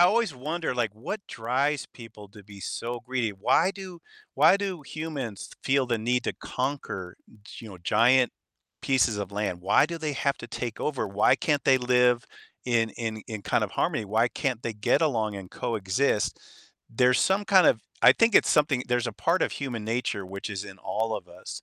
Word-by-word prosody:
always 205 0 +3
wonder, 155 +6 -3
like, 120 -3 0
what 140 - -5
drives 130 +5 -1
people 110 -4 -12
to 105 0 -15
be 100 -1 -13
so 120 +4 -4
greedy? 125 -3 -2
Why 100 - +2
do 190 -3 -9 0.4
why 155 +7 +6
do 195 -5 -4
humans 140 -8 -6
feel 135 0 +3
the 120 -2 0
need 125 +3 0
to - - -1
conquer, 125 -9 -4 0.4
you 115 - -9
know, 95 -3 -11
giant 120 +7 +4 0.5
pieces 130 -5 +2
of 100 0 -5
land? 100 -4 -2
Why 95 +9 +4
do 170 0 -5
they 155 -2 -2
have 140 0 0
to 120 - -8
take 120 -1 -5
over? 150 -3 -1
Why 100 +2 +3
can't 145 -2 0
they 135 - +5
live 125 -1 +3 0.4
in 115 -3 +1
in 110 0 -5
in 110 -3 -6
kind - - +1
of - - -7
harmony? 110 - 0
Why 110 +4 +2
can't 125 -2 -2
they 115 - -3
get 105 +9 +1
along 110 -9 0
and 95 -2 -9
coexist? 110 +1 -1 0.5
There's 125 +2 +3
some 195 +2 +2
kind 190 -4 +5
of 110 - +4 0.2
I - - +9
think 230 -1 +3
it's - - +4
something 145 -4 +2
there's 120 -1 +1
a - - -6
part 170 +3 +1
of - - +1
human 120 -6 -4
nature 110 -3 -2
which 100 +3 -6
is 100 -1 -4
in 100 -2 -11
all 110 +3 -2
of - - -9
us, - - -9
120 Hz, 195 wpm, -27 LUFS, 110-140 Hz, 0.5 s, I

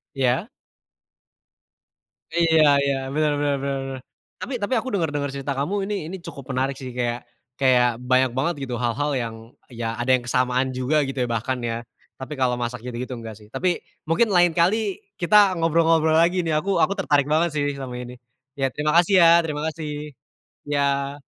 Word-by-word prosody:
Iya. 130 - +1 1.9
Iya 165 -2 +4 0.2
iya, 140 -1 +1 0.2
bener 150 0 +2
bener 145 -1 +1
bener 140 -1 -2
bener. 135 -1 -6 0.4
Tapi 265 - -5
tapi 205 +6 -1
aku 260 - -7
denger-denger 145 -6 -1
cerita 140 +1 -3
kamu 145 +8 -1
ini 210 - -2
ini 190 +2 -6
cukup 140 - -8
menarik 135 +1 -1
sih. 130 - -6
Kayak 120 0 -1 0.4
kayak, 125 -2 +4 0.2
banyak 130 -1 +4
banget 170 +6 +1
gitu 125 -2 -4
hal-hal 145 +5 0
yang, 115 -1 -5 0.3
ya 120 -1 -6
ada 120 +2 -2
yang 120 - -10
kesamaan 125 +2 +1
juga 135 +3 +1
gitu 135 - -6
ya, 120 - -1
bahkan 115 +3 -1
ya. 115 0 -3 0.3
Tapi, 130 +3 -7
kalau 125 -3 0
masak 120 -1 -4
gitu-gitu 125 +1 -5
enggak 115 -3 -8
sih. 105 - -16
Tapi, 175 +5 0 0.3
mungkin 205 +5 +2
lain 175 -2 +4
kali 200 +3 +2 0.2
kita 200 +1 +5
ngobrol-ngobrol 165 -1 +3
lagi 175 +2 +3
nih 165 - -3
aku 195 +5 0
aku 200 +1 +2
tertarik 145 -6 +1
banget 165 +3 +2
sih 145 -2 -1
sama 130 -2 -6
ini. 125 0 -8 0.4
Ya 135 -1 -1
terima 150 +1 -1
kasih 175 +3 +4
ya, 165 - +8 0.2
terima 150 -1 -3
kasih! 155 -1 -6 0.8
Iya. 140 0 -1
140 Hz, 175 wpm, -23 LUFS, 125-165 Hz, 1.9 s, ya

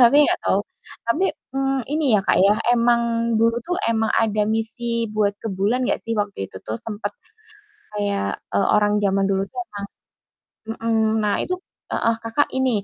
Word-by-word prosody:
tapi 285 +5 +6
enggak - - +1
tau. 195 - +3 0.5
Tapi, 315 +11 +2 0.3
mmm, 270 -1 0
ini 310 +1 0
ya 205 - +5
Kak - - +4
ya, 200 +2 +5 0.2
emang 235 -1 +2
dulu 230 +1 +3
tuh 360 0 -1
emang 220 -1 +1
ada 215 -2 +2
misi 230 +1 -1
buat 205 -1 +2
ke 225 - -3
bulan 205 +7 0
enggak - - +1
sih 230 - -1
waktu 205 - -2
itu - - -11
tuh, 110 - -2
sempet 215 -1 -5 0.8
kayak, 205 -1 -1 0.3
e - - +3
orang 210 +1 +3
zaman 195 0 +2
dulu 195 0 +1
tuh - - -11
emang 205 - -9 0.9
Mhm. 225 -1 +1
Nah 205 -1 +2
itu 365 - -1 0.4
heeh, 230 - +2
Kakak 230 +6 +1
ini, 260 -1 +2
225 Hz, 175 wpm, -22 LUFS, 205-235 Hz, 0.9 s, tapi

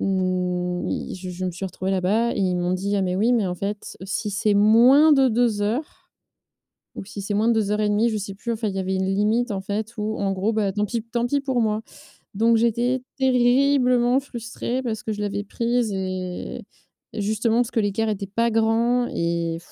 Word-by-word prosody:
n 180 -2 -1
ils - - -4
je 185 0 -8
je 180 +1 -5
me 185 - -1
suis 185 +3 -5
retrouvée 185 +1 -4
là-bas 200 +5 +1
et - - -4
ils 185 -2 +1
m'ont 175 +1 0
dit: 200 +2 -1
«Ah 195 - +1
mais 180 -1 -1
oui, 225 +5 +2
mais 220 -4 +1
en 180 - -2
fait 200 +3 -5
si 205 +2 -3
c'est 205 +1 +1
moins 245 +9 +6
de 270 -2 +5
2 230 -2 +1
heures, 240 +9 -3 0.9
ou - - -7
si 205 0 -8
c'est 205 +1 -3
moins 220 +3 +2
de - - +5
2:30», 210 +1 +1
je 215 - -2
sais 195 -1 -6
plus. 235 +4 -4
Enfin 225 -1 -2
il 195 - -4
y - - -1
avait 190 0 -2
une 190 0 0
limite, 215 +5 +1
en 195 -2 -2
fait, 215 +3 -4
ou 215 +1 -2
en 195 -1 0
gros 195 +4 0
bah 215 -3 0
tant 210 +1 -1
pis 230 +1 -3
tant 235 +1 -2
pis 285 +3 0
pour 265 -3 -1
moi. 215 -1 0 0.5
Donc 230 +3 +3
j'étais 240 +3 +1 0.2
terriblement 250 0 +3
frustrée, 245 -1 -5
parce 225 -4 -3
que 220 - -5
je 210 - -5
l'avais 205 0 -2
prise 235 0 -1
et 185 -1 -4 0.5
et - - -4
justement 220 +2 0
parce 240 -1 0
que 225 - +1
l'écart 210 +2 0
était 205 -2 -2
pas 230 +2 +1
grand 230 +2 +2
et 170 -1 -1
215 Hz, 215 wpm, -23 LUFS, 195-235 Hz, 0.9 s, moins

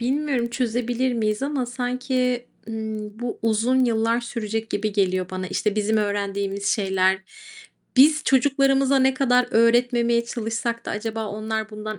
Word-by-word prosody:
Bilmiyorum, 260 -1 0
çözebilir 245 +1 -1
miyiz 215 +1 -1
ama 275 -3 -1
sanki, 250 0 -1 0.2
ımm, 220 -1 -5
bu 240 -1 -4
uzun 230 +4 +2
yıllar 230 0 +1
sürecek 225 -2 -4
gibi 210 0 -1
geliyor 185 -2 0
bana. 185 0 -4
İşte, 210 +2 -1
bizim 215 +1 +1
öğrendiğimiz 200 -1 -2
şeyler, 190 -2 +2 0.8
biz 300 +3 +6
çocuklarımıza 275 0 +3
ne 265 0 +3
kadar 250 -2 +3
öğretmemeye 235 0 +3
çalışsak 235 0 -3
da - - -3
acaba 220 +1 -3
onlar 215 +1 -4
bundan 215 -1 -6
230 Hz, 135 wpm, -23 LUFS, 215-250 Hz, 0.8 s, biz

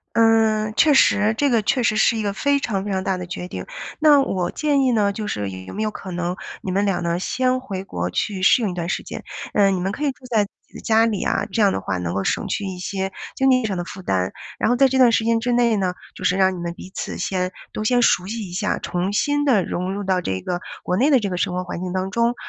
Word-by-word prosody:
呃， 220 -1 +3
确 295 +6 +4
实 215 -4 +4
这 285 +3 +2
个 235 -2 +3
确 250 +5 +1
实 215 -2 +2
是 230 +1 +3
一 220 - -1
个 205 -1 -1
非 285 +7 +1
常 200 -8 -2
非 205 - -4
常 190 -1 -1
大 190 - 0
的 180 -1 -6
决 180 0 -6
定。 - - -7 0.3
那 300 -2 +6
我 185 -9 -1
建 295 -2 +1
议 260 - +3
呢， 205 -3 +2
就 210 +1 -5
是 100 - -3
有 95 0 -8
没 215 - -2
有 215 - 0
可 195 - -8
能 175 0 -2 0.3
你 190 - -3
们 200 +2 +1
俩 195 -2 0
呢 170 0 0
先 255 +6 0
回 195 -7 -5
国 90 - -3
去 190 - -2
适 215 +5 +5
应 210 - 0
一 - - -5
段 170 -1 -3
时 - - -1
间。 - - -7 0.3
呃， 200 -2 +4
你 190 -2 0
们 190 +2 -1
可 295 - -4
以 290 - +2
住 260 -1 -14
在 220 -3 +3
自 200 - -13 0.2
己 - - -31
的 - - -8
家 225 0 +3
里 215 -4 -1
啊， - - 0
这 225 - 0
样 200 - +4
的 - - -2
话 95 -1 -2
能 90 -1 -3
够 100 0 -1
省 - - -1
去 205 - -2
一 190 -2 -5
些 190 +1 -3 0.2
经 270 0 +3
济 255 -2 +3
上 205 -3 -1
的 175 - -3
负 190 - -9
担。 95 - 0 0.3
然 - - +1
后 245 - +3
在 270 +1 +5
这 265 - -1
段 250 -3 +6
时 225 - +2
间 230 0 +2
之 245 +2 -1
内 235 -2 +3
呢， 185 -2 0 0.2
就 - - -9
是 180 - +2
让 190 -1 +3
你 - - -7
们 170 0 -3
彼 185 - -11
此 - - -4
先 185 -1 -1 0.2
都 215 - -4
先 245 +2 +3
熟 180 -5 +3
悉 215 -1 -5
一 - - -10
下， 205 +4 -1
重 180 +2 -2
新 290 +7 +1
地 245 -9 +4
融 180 +3 -3
入 205 - -3
到 185 -1 +1
这 95 - -2
个 175 - -3 0.2
国 180 - -1
内 265 +9 +3
的 270 -4 +5
这 205 - -2
个 180 - -2
生 180 0 -1
活 180 0 -2
环 175 - -5
境 180 -1 -3
当 185 +1 -2
中。 235 +3 +1
200 Hz, 310 characters per minute, -22 LUFS, 180-230 Hz, 0.3 s, 那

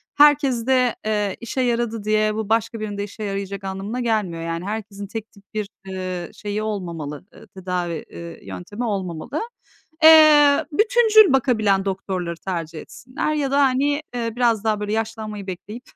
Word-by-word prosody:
Herkeste, 265 -4 +4
eee, 210 -2 0
işe 235 +3 -3
yaradı 235 -3 -1
diye 215 0 +1
bu 220 -1 -3
başka 225 0 0
birini 210 -1 -4
de 200 - -2
işe 210 +1 -8
yarayacak 200 -1 -4
anlamına 195 +5 -4
gelmiyor. 210 -8 -1
Yani 165 +1 -4
herkesin 205 -1 -5
tek 220 +1 -7
tip 200 - -20
bir, 210 -2 -2 0.2
eee, 185 -2 -4
şeyi 210 +1 -4
olmamalı, 170 -8 -5
eee, - - -15
tedavi, 180 -3 -4
eee, 170 0 -10
yöntemi 205 +7 -6
olmamalı. 190 - -3 0.6
Eee, 305 -3 +8
bütüncül 435 - +5
bakabilen 215 -7 +2
doktorları 185 -3 -3
tercih 165 -4 -4
etsinler 255 +4 -4
ya 285 -3 -1
da 280 +1 +4
hani, 280 +3 +2
eee, 230 -1 -2
biraz 230 -3 +2
daha 215 -2 +1
böyle 210 0 -3
yaşlanmayı 215 -2 -4
bekleyip 210 +6 -7
215 Hz, 155 wpm, -22 LUFS, 195-245 Hz, 0.6 s, Eee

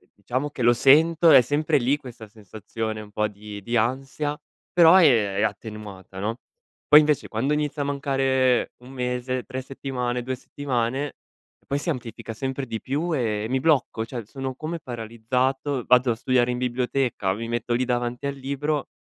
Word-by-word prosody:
diciamo 130 +8 -3
che - - -7
lo 120 +1 +6
sento, 160 +6 +5
è - - +10
sempre 150 +4 +1
lì 135 +2 +2
questa 120 -6 -11
sensazione 110 +1 -6
un 105 - -12
po' 105 +1 0
di 105 0 -9
di 120 +4 -1
ansia, 135 +5 -1 0.4
però, 175 +2 +7
ehm, 110 -10 +4
è - - +1
attenuata 105 -3 -5
no. 110 +4 -2 0.5
Poi 150 0 +9
invece 150 -1 +1
quando 130 +7 0
inizia 150 -1 -1
a - - -4
mancare 135 -3 +1
1 125 - -12
mese, 125 0 -2
3 130 0 -5
settimane, 125 -2 -3
2 130 +1 -3
settimane, 130 +1 -2 0.6
poi 140 - +1
si 170 - -1
amplifica 115 -4 -6
sempre 130 +3 -3
di 115 -2 -5
più 155 +6 -2
e 110 -4 -1
mi 130 0 +1
blocco, 135 -6 +1
cioè 115 -1 -6
sono 130 +3 -5
come 160 +4 -5
paralizzato, 125 +3 -2
vado 125 0 +4
a 115 - -1
studiare 125 +1 +1
in 125 - -2
biblioteca, 125 -4 -1
mi 115 +3 -5
metto 120 0 -2
lì 125 +1 +1
davanti 120 +1 -2
al 140 - -2
libro 140 +2 -2
125 Hz, 175 wpm, -24 LUFS, 115-140 Hz, 0.6 s, è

